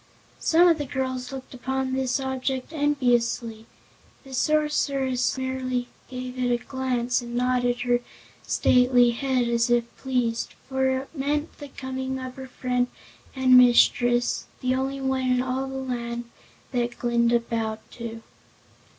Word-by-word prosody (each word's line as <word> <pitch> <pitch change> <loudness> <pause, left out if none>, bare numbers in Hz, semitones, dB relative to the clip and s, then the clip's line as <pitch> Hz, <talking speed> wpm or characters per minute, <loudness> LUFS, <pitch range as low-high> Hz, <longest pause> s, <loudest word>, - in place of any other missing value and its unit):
Some 340 +2 +5
of 330 -3 +4
the 290 - -2
girls 260 0 -3
looked 265 0 -8
upon 265 +1 -2
this 265 +1 0
object 265 +1 -3
enviously; 240 -6 0 0.6
the 270 -1 -12
Sorceress 275 -3 +1
merely 255 -1 -2 0.2
gave 255 0 -6
it 250 -1 +1
a 240 - +3
glance 250 -1 -1
and 240 0 -7
nodded 245 0 +1
her 245 0 +2 0.4
stately 250 -1 +4
head 255 0 0
as 235 +1 +1
if 240 -1 +3
pleased, 245 -3 -1
for 265 0 +1
it 260 +1 -2
meant 295 +2 -2
the 290 - -7
coming 265 -1 -4
of 255 -1 -6
her 265 0 -7
friend 250 -1 -1 0.5
and 260 -1 +5
mistress 245 0 +5 0.2
the 255 0 +1
only 270 +1 -1
one 265 -1 0
in 250 - +2
all 260 +1 -2
the 265 - -6
land 240 -2 -3 0.5
that 245 -1 -1
Glinda 235 0 +2
bowed 225 -2 -3
to. 230 -1 -7
255 Hz, 140 wpm, -25 LUFS, 245-265 Hz, 0.6 s, Some